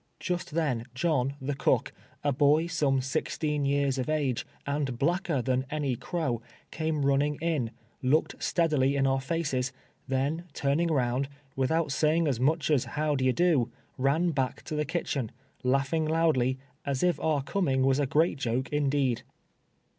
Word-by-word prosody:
Just 175 -3 -3
then 135 -9 0
John, 140 -3 +1
the 135 +2 -2
cook, 135 - +1 0.3
a 145 - +2
boy 145 +4 +4
some 145 -6 +1
sixteen 145 +2 -1
years 140 -1 +1
of 130 - -2
ago, 145 -6 0 0.2
and 140 -3 -1
bhicker 165 -2 0
than 130 0 +1
any 150 -4 -1
crow, 135 -4 -2 0.3
came 155 -3 -1
run 140 0 +4
ning 150 +1 +1
in, 155 -8 0 0.3
looked 140 +5 +1
steadily 150 -5 +2
in 135 -1 +2
our 135 0 +2
faces, 135 -4 -1 0.4
then 140 +6 -1
turning 145 +5 +1
round, 135 -3 +1 0.3
without 150 +3 +1
saying 155 +3 +2
as 130 -5 0
much 155 +5 +2
as 140 -5 +3
"how 150 0 -1
d'ye 130 -1 +2
do," 150 -6 +2 0.2
ran 150 +7 +2
back 135 -4 -2
to 155 - -5
the 150 0 0
kitchen, 140 -7 -2 0.3
laughing 135 +5 +1
loudly, 155 -6 +2 0.3
as 140 0 -1
if 175 -4 +2
our 150 -3 +1
coming 135 -6 +1
was 135 +1 +3
a 145 - +1
great 155 +1 +2
Joke 125 +1 -1
indeed. 140 -4 +1
140 Hz, 160 wpm, -28 LUFS, 130-155 Hz, 0.4 s, boy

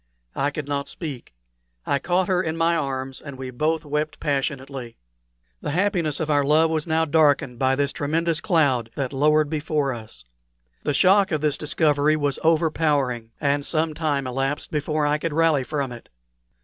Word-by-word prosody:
I 140 - +1
could 145 0 -6
not 140 0 -2
speak. 145 -8 -7 0.5
I 140 - +1
caught 175 +4 +1
her 185 -1 +2
in 160 -2 -3
my 165 +1 +2
arms, 135 -3 -3
and 140 -3 -9
we 130 -1 -6
both 155 +5 -1
wept 150 +1 -2
passionately. 135 -4 -3 0.6
The - - -3
happiness 170 -3 0
of 160 - -1
our 145 -2 +2
love 155 +3 +3
was 155 -1 -1
now 160 0 +2
darkened 145 -5 +2
by 130 0 +2
this 140 0 0
tremendous 160 +3 -1
cloud 140 - +2
that 135 -1 -3
lowered 150 +2 +3
before 150 -2 -1
us. 110 - -10 0.6
The 145 - -1
shock 195 +3 +4
of 155 -2 0
this 150 -2 +1
discovery 150 -1 +2
was 145 -3 -1
overpowering, 150 -7 +1
and 145 -1 +1
some 160 +1 0
time 150 -3 -1
elapsed 135 +3 -2
before 150 0 0
I 150 +1 +1
could 165 -1 -2
rally 160 -3 +3
from 140 -1 -3
it. 120 -1 -11
150 Hz, 175 wpm, -23 LUFS, 140-160 Hz, 0.6 s, shock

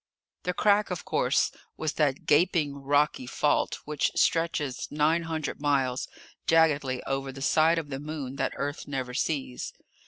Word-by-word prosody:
The 180 - -2
Crack, 205 0 +3
of 180 -3 -4
course, - - +2 0.3
was 155 -1 -2
that 145 -3 0
gaping 150 -2 +3
rocky 140 -1 +1
fault 145 +3 +1
which 150 -1 0
stretches 165 -5 +1
nine 155 +3 +2
hundred 160 -3 -4
miles, 135 -3 +1 0.4
jaggedly, 145 -6 +3
over 135 0 -2
the 135 0 -7
side 160 +3 +4
of 155 -3 -3
the 135 - -3
Moon 145 -3 -5
that - - -1
Earth 145 +1 -4
never 130 -3 -3
sees. 135 -2 -2
145 Hz, 150 wpm, -28 LUFS, 135-160 Hz, 0.4 s, side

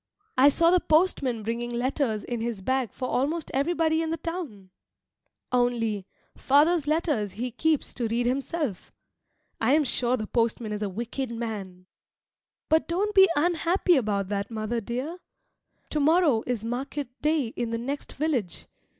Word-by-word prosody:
I 265 +3 +7
saw 335 +4 +3
the 365 - +5
postman 305 -9 +1
bringing 235 +2 -2
letters 240 -2 -1
in 240 -2 -4
his 225 -4 -3
bag 260 -2 0
for 255 - -4
almost 300 +7 -1
everybody 320 +3 +1
in 325 - -2
the 330 - -1
town. 285 - -6 0.8
Only, 230 -5 0 0.3
father's 295 +3 +3
letters 295 - 0
he 240 +5 -4
keeps 310 +5 0
to 240 -2 -2
read 235 +2 0
himself. 270 - -2 0.7
I 240 +4 +3
am 310 - +3
sure 250 -1 +1
the 215 - -4
postman 230 -1 0
is 210 0 -3
a 205 - -1
wicked 235 +6 -4
man. 210 -6 -5 0.8
But 315 +1 +2
don't 395 +5 0
be 385 -2 +7
unhappy 345 +3 +2
about 205 -7 0
that, 200 -1 -2
mother 225 +1 -2
dear. 255 - -4 0.7
To 305 - 0
morrow 300 -5 +4
is 235 -3 -2
market 265 +3 -3
day 300 -5 +1
in 235 0 -3
the 230 - -1
next 275 +5 -5
village. 270 - -2
250 Hz, 155 wpm, -26 LUFS, 225-315 Hz, 0.8 s, I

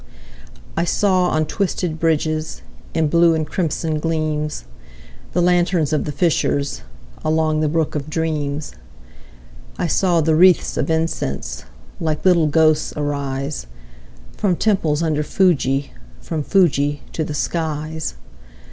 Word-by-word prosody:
I 170 - +1
saw, 185 +1 +2
on 155 0 +1
twisted 175 -2 -2
bridges, 155 -1 -1 0.3
In 160 -1 +2
blue 170 +1 +4
and 155 -1 -1
crimson 160 -1 -2
gleams, 155 - -2 0.7
The 175 - +2
lanterns 175 -3 +2
of 155 - 0
the 150 - -3
fishers, 145 -2 0 0.4
Along 155 0 +1
the 155 -1 +1
brook 160 0 0
of 150 0 -4
dreams. 155 -2 -2 1.1
I 180 - -1
saw 175 +1 +2
the 160 0 +2
wreathes 180 +3 +4
of - - -1
incense 65 - -2 0.3
Like 155 0 -2
little 170 -4 +5
ghosts 155 0 +3
arise, 140 - -3 0.7
From 195 -4 +1
temples 170 -7 +1
under 155 -2 +1
Fuji, 145 -5 +1 0.3
From 155 - -4
Fuji 145 -5 +2
to 160 - -1
the 150 -1 -4
skies. 155 0 -3
155 Hz, 125 wpm, -20 LUFS, 150-170 Hz, 1.1 s, little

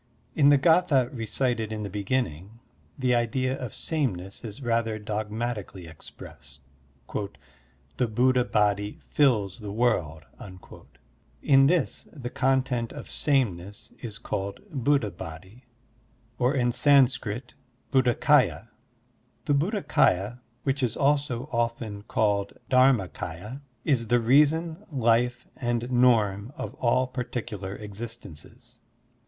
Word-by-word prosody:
In 145 -2 +5
the 145 - +6
g^tha 145 -4 +3
recited 115 -1 -1
in 105 -1 -4
the - - -3
beginning, 105 - -3 0.4
the 130 -2 +1
idea 130 +2 0
of 125 -4 -5
sameness 100 - -3
is 115 +4 -7
rather 115 -2 0
dogmatically 105 -2 -4
expressed: 70 -3 -13 1.4
"The 125 - +1
Buddha 125 +3 +3
Body 105 -2 +1
fills 120 -8 +2
the 105 -2 -6
world." 90 -9 0 1.2
In 135 -1 +6
this 170 -2 0
the 125 -5 -7
content 130 -3 0
of - - -9
sameness 100 - -1
is 110 -3 -6
called 100 -1 -4
Buddha 135 -6 +1
Body 90 +8 -10 0.7
or 125 +3 +2
in 120 -2 +2
Sanskrit 130 -3 +2 0.4
Buddhakaya. 130 -3 +3 0.8
The 145 - +2
Bud 160 +10 +1
dhakdya, 120 - +1 0.2
which 135 0 -1
is 120 -3 -1
also 140 -3 +1
often 115 -3 -2
called 100 -2 0 0.2
Dharma 130 -6 +4
k^ya, 90 - -7 0.2
is 125 -7 +1
the 120 +2 +3
reason, 155 - +3
life, 120 -2 +1
and 120 -1 -2
norm 115 -2 +3
of - - -5
all 130 +1 +2
particular 120 -6 -5
existences. 105 -6 -10
120 Hz, 115 wpm, -26 LUFS, 105-130 Hz, 1.4 s, the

